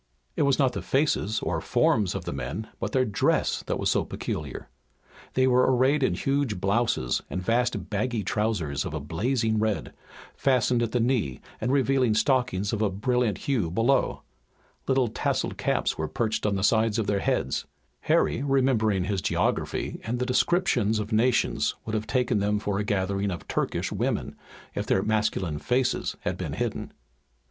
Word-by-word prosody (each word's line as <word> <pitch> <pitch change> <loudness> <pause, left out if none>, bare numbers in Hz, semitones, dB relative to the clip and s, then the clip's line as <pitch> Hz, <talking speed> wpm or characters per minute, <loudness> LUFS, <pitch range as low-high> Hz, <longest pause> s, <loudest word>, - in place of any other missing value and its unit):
It - - 0
was 140 -2 +3
not 130 -3 +2
the 100 - -3
faces 110 - +1
or - - -1
forms 105 -5 +2
of - - -4
the - - -3
men, 80 - -4
but - - -3
their 130 -1 +2
dress 105 -4 +1
that - - -1
was - - +1
so - - +2
peculiar. 75 -3 -5 0.7
They 130 - +4
were 125 0 +4
arrayed 130 +4 +3
in 130 - +2
huge 135 -8 0
blouses 100 - +1
and 90 - -3
vast 120 +6 0
baggy 110 +1 -1
trousers 100 -9 -1
of 75 - -5
a - - -2
blazing 110 - 0
red, 110 -1 -1 0.4
fastened 125 -2 +2
at 115 -1 -1
the 125 - +1
knee 115 - 0 0.2
and 125 - 0
revealing 130 -4 +2
stockings 110 -4 +1
of 110 - -1
a 105 - +2
brilliant 115 +2 0
hue 125 - +1
below. 115 +10 +1 0.6
Little 130 -2 +3
tasselled 110 - -2
caps - - 0
were 80 - -1
perched 110 +4 -1
on 100 - +1
the 95 - -2
sides 110 0 +3
of 110 - 0
their 100 -1 +1
heads. - - -1 0.3
Harry - - +2
remembering 130 -8 +2
his 95 0 -1
geography - - -1
and 115 +2 -2
the 125 - -1
descriptions 125 - +2
of 105 +1 -4
nations 115 +3 +2
would 110 - -4
have 110 0 -2
taken 125 -4 +1
them 105 +1 +1
for 100 -1 -2
a - - 0
gathering 100 -1 0
of 90 -3 -6
Turkish - - -1
women, - - -2 0.4
if - - -3
their 95 - +2
masculine 105 -7 0
faces 125 +5 0
had - - -2
been - - -4
hidden. - - -3
110 Hz, 175 wpm, -26 LUFS, 100-125 Hz, 0.7 s, They